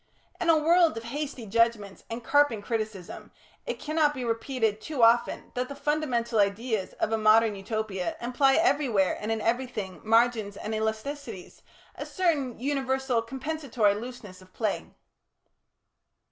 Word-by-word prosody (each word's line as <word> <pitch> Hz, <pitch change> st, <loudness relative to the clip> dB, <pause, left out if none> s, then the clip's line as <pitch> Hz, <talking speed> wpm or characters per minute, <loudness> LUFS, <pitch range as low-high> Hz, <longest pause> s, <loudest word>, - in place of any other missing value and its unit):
In 350 Hz, -2 st, 0 dB
a 325 Hz, -, +6 dB
world 330 Hz, -1 st, +4 dB
of 225 Hz, -, -5 dB
hasty 270 Hz, 0 st, -5 dB
judgments 220 Hz, -2 st, 0 dB
and 230 Hz, +1 st, -5 dB
carping 285 Hz, -6 st, +3 dB
criticism, 215 Hz, -5 st, -5 dB, 0.4 s
it -, -, -2 dB
cannot 305 Hz, -1 st, +1 dB
be 255 Hz, -2 st, -4 dB
repeated 230 Hz, -2 st, -1 dB
too 280 Hz, -1 st, -1 dB
often 230 Hz, +1 st, +3 dB
that 250 Hz, 0 st, -2 dB
the 280 Hz, -, -6 dB
fundamental 260 Hz, -7 st, 0 dB
ideas 205 Hz, +1 st, 0 dB
of -, -, -2 dB
a 225 Hz, -, +1 dB
modern 215 Hz, 0 st, +5 dB
Utopia 195 Hz, -2 st, -3 dB
imply 265 Hz, +3 st, +2 dB
everywhere 275 Hz, -, +2 dB
and 215 Hz, +1 st, -2 dB
in 220 Hz, -1 st, -1 dB
everything, 230 Hz, -5 st, -2 dB
margins 225 Hz, -2 st, +2 dB
and 220 Hz, -, -5 dB
elasticities, 220 Hz, 0 st, -4 dB, 0.3 s
a -, -, -7 dB
certain 300 Hz, -, 0 dB
universal 265 Hz, -2 st, 0 dB
compensatory 260 Hz, -3 st, -1 dB
looseness 210 Hz, -4 st, -8 dB
of 185 Hz, 0 st, -18 dB
play. 215 Hz, -3 st, -2 dB
230 Hz, 140 wpm, -27 LUFS, 215-275 Hz, 0.4 s, a